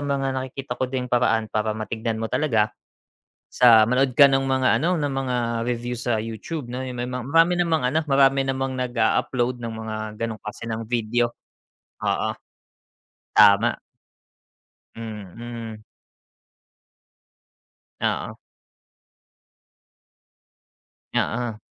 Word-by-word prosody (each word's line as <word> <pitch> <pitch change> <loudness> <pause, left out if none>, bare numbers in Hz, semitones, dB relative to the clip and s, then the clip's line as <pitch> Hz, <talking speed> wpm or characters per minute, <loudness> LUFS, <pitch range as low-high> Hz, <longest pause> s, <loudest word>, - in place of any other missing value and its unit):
mga 140 -1 -1
nakikita 130 0 -5
ko 130 - 0
din 130 -1 -2
paraan 115 -2 +2
para 110 0 -1
matignan 110 +1 -3
mo 115 - -2
talaga 110 -8 +1 0.8
sa 115 -3 +6
manood 130 +2 +2
ka 140 - +10
ng 135 0 +2
mga 130 -1 +1 0.2
ano, 175 -1 +1
ng 145 -2 -1
mga 130 -2 -1 0.3
review 120 0 -2
sa 120 -2 -1
YouTube 115 +6 -5
'no, 125 +2 -5
yung 125 -2 -6
may 120 - -2
mga 125 -1 -4
marami 165 +2 +5
namang 165 -5 +1
ano, 155 +5 +1
marami 135 -1 +4
namang 135 0 -2
nag-a-upload 120 0 0
ng 115 -1 -4
mga 110 -1 -5 0.2
ganong 115 -1 -3
klase 110 +2 -7
ng 110 0 -3
video, 120 +1 0 0.7
oo, - - 0 1.1
tama. 100 +4 +6 1.2
Mm. 110 +1 -8 2.2
Oo. - - -2 2.8
Oo. 115 -2 -1
120 Hz, 115 wpm, -23 LUFS, 115-135 Hz, 2.8 s, ka